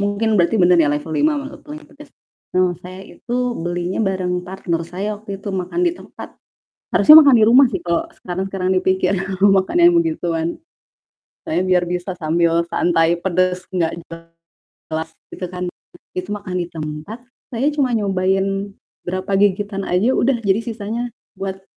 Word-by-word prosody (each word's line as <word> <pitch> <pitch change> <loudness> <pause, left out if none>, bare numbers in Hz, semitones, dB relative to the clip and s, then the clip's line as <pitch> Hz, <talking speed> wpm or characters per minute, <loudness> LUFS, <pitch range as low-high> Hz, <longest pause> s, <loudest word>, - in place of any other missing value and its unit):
mungkin 205 +2 0
berarti 175 +6 +2
bener 180 -2 +4
ya 150 - +3
level 150 +2 -3
5 300 - +2
mala 280 - -9
paling 305 +1 -10
pedes. 295 0 -16 0.5
Mmm, 185 -1 +3
saya 185 +1 -10 0.2
itu 240 - -6 0.3
belinya 175 +3 -2
bareng 185 -3 -1
partner 180 -2 -3
saya 200 +4 -3
waktu 200 -3 -7
itu 200 - -7
makan 190 - -3
di 345 - +2
tempat. - - -11 0.7
Harusnya 305 +1 +9
makan 275 - +7
di 215 - +5
rumah 255 +5 +7
sih 190 - -3
kalo 170 -1 -1 0.2
sekarang-sekarang 185 +1 -3
dipikir 185 0 +1 0.3
makan 195 - +3
yang 345 0 +7
begituan. 175 - -1 1.0
Saya 315 - -1
biar 180 -1 +3
bisa 180 +1 -3
sambil 170 0 +1
santai 170 0 +2
pedes 185 0 0
gak 165 -3 +1 0.8
jelas 160 0 -6 0.2
gitu 180 - -5
kan, 180 0 -6 0.5
it 185 - -1
itu - - -14
makan 185 -3 -6
ditempat, 155 +6 -7 0.3
saya 250 +2 -1
cuma 270 -5 0
nyobain 195 0 0 0.3
berapa 185 +2 -3
gigitan 200 0 0
aja 190 +8 +2
udah, 260 0 +2
jadi 200 +1 +2
sisanya 230 +1 -4 0.3
buat, 190 0 -5
190 Hz, 155 wpm, -19 LUFS, 175-215 Hz, 1.0 s, Harusnya